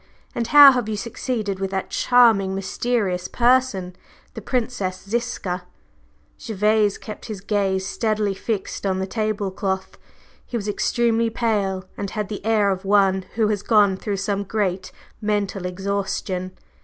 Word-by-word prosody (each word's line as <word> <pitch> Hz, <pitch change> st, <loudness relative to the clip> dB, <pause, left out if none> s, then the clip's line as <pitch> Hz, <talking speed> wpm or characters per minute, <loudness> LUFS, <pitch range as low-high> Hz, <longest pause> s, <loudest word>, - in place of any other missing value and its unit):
And 235 Hz, -1 st, -2 dB
how 285 Hz, +1 st, +10 dB
have 245 Hz, -4 st, -1 dB
you 215 Hz, -, -2 dB
succeeded 215 Hz, -3 st, -3 dB
with 195 Hz, 0 st, -2 dB
that 190 Hz, 0 st, -3 dB
charming 225 Hz, -6 st, +4 dB
mysterious 195 Hz, -2 st, -1 dB
person, 240 Hz, -7 st, +1 dB, 0.4 s
the -, -, -7 dB
Princess 220 Hz, -7 st, -2 dB
Ziska?" 200 Hz, -6 st, -3 dB, 0.7 s
Gervase 210 Hz, -2 st, +1 dB
kept 215 Hz, -, -9 dB
his 215 Hz, -4 st, -6 dB
gaze 195 Hz, -2 st, 0 dB
steadily 215 Hz, 0 st, 0 dB
fixed 195 Hz, 0 st, -4 dB
on 190 Hz, -2 st, 0 dB
the 190 Hz, -, -1 dB
table 215 Hz, -1 st, -2 dB
cloth. 190 Hz, 0 st, -3 dB, 0.4 s
He 240 Hz, -, -4 dB
was 210 Hz, -2 st, -5 dB
extremely 230 Hz, +2 st, +1 dB
pale, 205 Hz, -5 st, -1 dB
and 200 Hz, -, -3 dB
had 210 Hz, 0 st, -4 dB
the 210 Hz, -, -6 dB
air 215 Hz, -2 st, +2 dB
of 190 Hz, 0 st, -3 dB
one 195 Hz, -1 st, +3 dB
who 220 Hz, -2 st, +2 dB
has 205 Hz, -2 st, -1 dB
gone 205 Hz, -3 st, +4 dB
through 200 Hz, +1 st, -3 dB
some 200 Hz, +1 st, -1 dB
great 190 Hz, -3 st, -2 dB, 0.3 s
mental 205 Hz, -3 st, -1 dB
exhaustion. 190 Hz, -1 st, -3 dB
205 Hz, 145 wpm, -22 LUFS, 190-225 Hz, 0.7 s, how